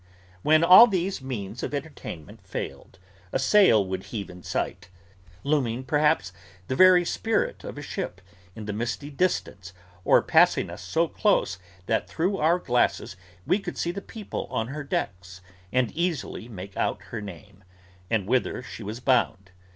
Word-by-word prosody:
When 155 - +4
all 185 +7 +10
these 190 - -1
means 115 -4 -5
of - - -3
entertainment 140 - -7
failed, 95 - -7 0.3
a - - +1
sail 135 - +5
would 95 0 -4
heave 105 -4 -6
in 90 0 -12
sight: 90 0 -3 0.5
looming, 130 -4 0
perhaps, 130 - +1 0.3
the 130 - -1
very 185 +2 +7
spirit 225 +5 -1
of - - -7
a - - -6
ship, - - -5 0.4
in 110 - -7
the 105 - -3
misty 120 +7 -4
distance, 100 - -2 0.3
or - - +5
passing - - +4
us - - -8
so 160 - 0
close 155 - +1 0.3
that 110 +3 0
through 185 +5 0
our 165 +3 +3
glasses 125 - 0 0.3
we 195 - +2
could - - -6
see 170 - -1
the 200 +3 -6
people 215 0 -6
on 115 +1 -2
her 150 +2 -5
decks, 90 -8 -4 0.3
and 125 -2 +1
easily 160 -8 -3
make 95 -2 -9
out - - -1
her 115 - -4
name, 100 0 -11 0.5
and 110 -4 +1
whither 125 +2 0
she 120 - -9
was 110 +3 -6
bound. 115 -7 +1
125 Hz, 160 wpm, -26 LUFS, 100-165 Hz, 0.5 s, all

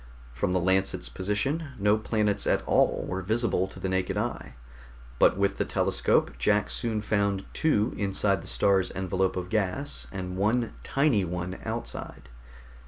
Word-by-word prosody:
From 65 +8 -1
the 90 - +2
Lancet's 95 -7 +1
position, 135 - -2
no 105 +1 +3
planets 105 -2 0
at - - +2
all - - +2
were 95 +1 -3
visible 110 -1 +1
to - - -12
the - - -2
naked 95 +1 -1
eye, 120 +4 -3 0.6
but - - +5
with 100 0 +1
the - - +1
telescope - - +1
Jack 105 0 +2
soon 110 -3 -1
found 100 -2 0
two 125 -8 +1
inside 100 -1 +1
the - - -11
star's 95 -2 +2
envelope 95 0 0
of 90 -1 -4
gas 110 +8 -1
and 95 -1 -5
one 110 +4 +1
tiny 135 -8 +2
one 90 +1 -4
outside. 65 - -6
100 Hz, 155 wpm, -27 LUFS, 95-110 Hz, 0.6 s, but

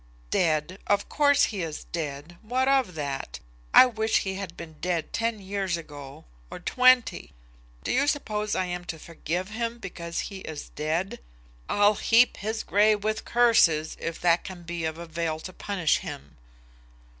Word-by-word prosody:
"Dead; 165 +2 +1
of 205 0 +2
course 285 -1 +4
he 205 -4 0
is 160 -2 -5
dead. 155 0 -5
What 255 +4 0
of 265 -10 +2
that? 140 - -4 0.3
I - - +9
wish 220 -2 +1
he 190 - -3
had 190 -3 -6
been 160 -2 -9
dead 175 -1 -2
ten 230 -1 -1
years 195 -2 -2
ago, 145 -4 -10 0.2
or - - -7
twenty. 250 - +3 0.5
Do - - -2
you 280 +3 +2
suppose 215 -8 -1
I 185 - 0
am 180 0 -4
to 165 - -5
forgive 170 +3 -4
him 230 +2 -3
because 170 -5 -5
he 195 - -7
is 155 -5 -7
dead? 160 +5 -2 0.5
I'll 205 +1 +4
heap 230 +3 +4
his 220 +2 -3
grave 210 0 +3
with 215 0 -1
curses, 205 -10 +4
if 165 0 -4
that 175 -1 +3
can 185 -2 -9
be 170 -1 -4
of 160 0 -3
avail 165 -1 -3
to 185 - -8
punish 180 -6 0
him." 70 +1 -8
185 Hz, 165 wpm, -27 LUFS, 165-215 Hz, 0.5 s, I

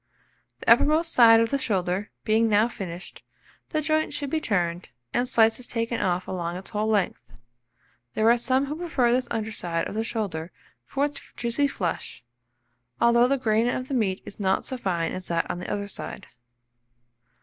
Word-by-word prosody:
The - - -10
uppermost 310 +7 +4
side 225 -2 +8
of 230 - 0
the 280 - +1
shoulder 190 -3 -1
being 225 +1 +3
now 210 +2 +4
finished, 180 -6 -8 0.5
the 310 - 0
joint 310 +1 0
should 285 -2 -3
be 320 - 0
turned, 175 - -1 0.2
and 245 +1 0
slices 230 0 +3
taken 230 0 -2
off 180 0 0
along 175 -2 -3
its 190 - -9
whole 210 +1 -1
length. 205 -4 +1 0.9
There 220 - +2
are 240 - +4
some 260 +3 +1
who 290 +2 -4
prefer 315 -8 +1
this 255 +1 +1
under 220 -1 -2
side 170 -5 -2
of - - -7
the 220 +1 -1
shoulder 195 -8 -3 0.3
for 275 - 0
its 290 0 -5 0.2
juicy 240 +4 +1
flesh, 175 - -4 0.8
although 235 +1 +5
the 275 +1 +2
grain 230 -1 +2
of 255 +1 -3
the - - -3
meat 200 -7 0
is - - -7
not 190 -1 +1
so 260 - -3
fine 175 -8 -1
as 185 0 -5
that 170 -1 0
on 175 - -5
the 180 - -6
other 200 0 -2
side. 200 - -7
225 Hz, 180 wpm, -25 LUFS, 190-255 Hz, 0.9 s, side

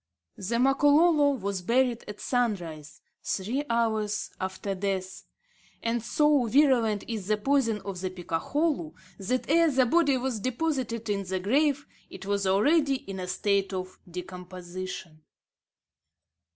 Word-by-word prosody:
The 220 +5 -2
Makololo 290 +4 +4
was 200 -5 -3
buried 240 +4 +1
at 210 0 -8
sunrise, 175 - -2 0.2
three 230 +9 -2
hours 220 -3 0
after 190 +1 -3
death; 190 -1 -3 0.6
and 230 0 0
so 290 +2 +3
virulent 235 -5 +3
is 215 -5 -4
the 215 0 +2
poison 230 -3 +1
of 190 -2 -6
the 185 - -2
picakholu 180 - -2 0.3
that, 250 +7 -1
ere 330 +2 +4
the 265 -3 +3
body 285 0 +3
was 255 -3 -2
deposited 255 -2 -2
in 200 -1 -1
the 185 0 -2
grave, 280 +8 +1 0.2
it - - -10
was 200 -1 0
already 275 - +3
in 195 -7 -7
a 180 - -4
state 195 +1 0
of 185 0 -5
decomposition! 180 -2 -7
215 Hz, 130 wpm, -27 LUFS, 190-265 Hz, 0.6 s, Makololo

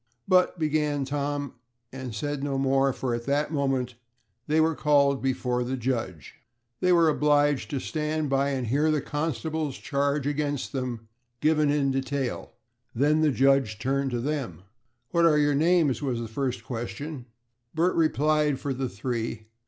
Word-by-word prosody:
"But," 185 -1 +3
began 150 -3 0
Tom, 145 0 -3 0.4
and 130 -4 -6
said 145 +4 -3
no 140 -1 -1
more, 135 0 +2
for 125 -1 -3
at 120 0 -3
that 145 +3 0
moment 135 -4 0 0.5
they 155 +1 +2
were 160 +1 +3
called 140 -2 +3
before 125 -2 0
the 130 +2 -3
judge. 115 - -3 0.5
They 180 - +2
were 170 -2 +5
obliged 145 -2 +2
to 140 - -2
stand 155 +1 -2
by 135 0 +1
and 130 -3 -2
hear 145 +7 +2
the 155 -1 +2
constable's 155 0 -3
charge 140 -2 -1
against 145 -1 -2
them, 125 -4 -4 0.3
given 155 0 +3
in 145 -2 +2
detail. 135 -1 -3 0.4
Then 150 +5 +3
the 155 - +4
judge 135 -5 +2
turned 135 +4 0
to 120 -2 -2
them 125 - -3 0.5
"What 170 -1 +4
are 155 -2 +4
your 145 -1 +3
names?" 160 -2 +2
was 130 -5 -1
the 115 - -4
first 125 +3 -3
question. 130 +3 -6 0.5
Bert 170 +3 +2
replied 150 -3 +2
for 140 - -2
the 130 0 -3
three. 115 0 -4
140 Hz, 160 wpm, -26 LUFS, 130-150 Hz, 0.5 s, were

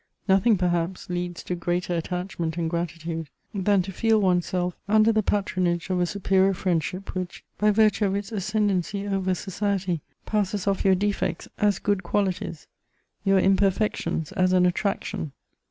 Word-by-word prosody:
Nothing, 195 +3 +4
perhaps, 175 0 -1
leads 175 -1 -3
to - - -3
greater 175 +1 -1
attachment 170 -1 -3
and 170 -1 0
gratitude 165 -1 -3 0.2
than 195 -1 +2
to 195 - -6
feel 225 +3 +2
one's 180 -3 +2
self 180 -1 -1
under 215 +2 +5
the 220 -1 +2
patronage 185 -4 0
of 180 - +1
a 175 - +2
superior 195 0 +2
friendship 180 +2 -2
which, 185 -1 -5 0.2
by 210 - +4
virtue 215 0 +3
of 195 - -1
its 200 +2 -4
ascendancy 200 -2 0
over 190 -2 0
society, 190 -3 -2 0.2
passes 205 -2 -1
off 200 -1 +1
your 190 -1 +5
defects 205 +2 -1
as 205 -3 +3
good 205 -2 0
qualities, 190 -6 -2 0.6
your 195 -1 +4
imperfections 190 -4 +1
as 185 0 +2
an 180 -1 +5
attraction. 180 -5 -1
190 Hz, 155 wpm, -25 LUFS, 175-200 Hz, 0.6 s, under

